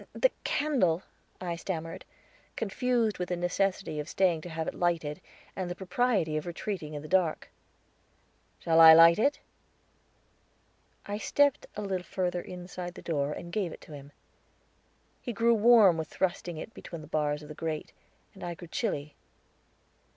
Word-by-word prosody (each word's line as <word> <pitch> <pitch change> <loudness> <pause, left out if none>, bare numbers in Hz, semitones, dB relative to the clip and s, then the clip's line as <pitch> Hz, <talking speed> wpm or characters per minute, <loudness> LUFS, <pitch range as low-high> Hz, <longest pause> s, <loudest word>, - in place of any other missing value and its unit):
"The - - +3
candle," 215 - +1 0.4
I 175 -2 -3
stammered, 165 -2 -5 0.5
confused 225 0 0
with 180 - -3
the 180 - 0
necessity 175 -2 -1
of 150 +2 -5
staying 180 -4 +2
to 175 - -8
have 160 -1 -4
it - - -2
lighted, 170 -2 -1 0.3
and 185 -2 -3
the 175 - -4
propriety 190 -4 0
of 155 - -4
retreating 170 -3 -4
in 145 - -6
the - - -8
dark. 180 -2 +1 1.1
"Shall 165 -1 +2
I 160 0 +11
light 165 +3 +8
it?" 280 +6 +2 1.6
I 205 +1 -4
stepped 285 +3 +2
a 210 - -4
little 190 -2 -2
further 180 -1 -2
inside 180 0 -7
the - - -10
door 145 -3 -1
and 170 +2 -8
gave 195 -6 -1
it - - -11
to 155 - -12
him. 140 0 -10 1.1
He 240 - -4
grew 230 +2 +3
warm 220 -5 +6
with 160 - -3
thrusting 175 -2 -2
it 225 +8 -8
between 170 -2 -9
the 155 - -11
bars 150 -1 -1
of - - -10
the 150 - -8
grate, 155 0 -4 0.4
and 190 - -12
I 175 -1 -4
grew 175 0 -11
chilly. 150 -11 -2
175 Hz, 165 wpm, -29 LUFS, 160-195 Hz, 1.6 s, I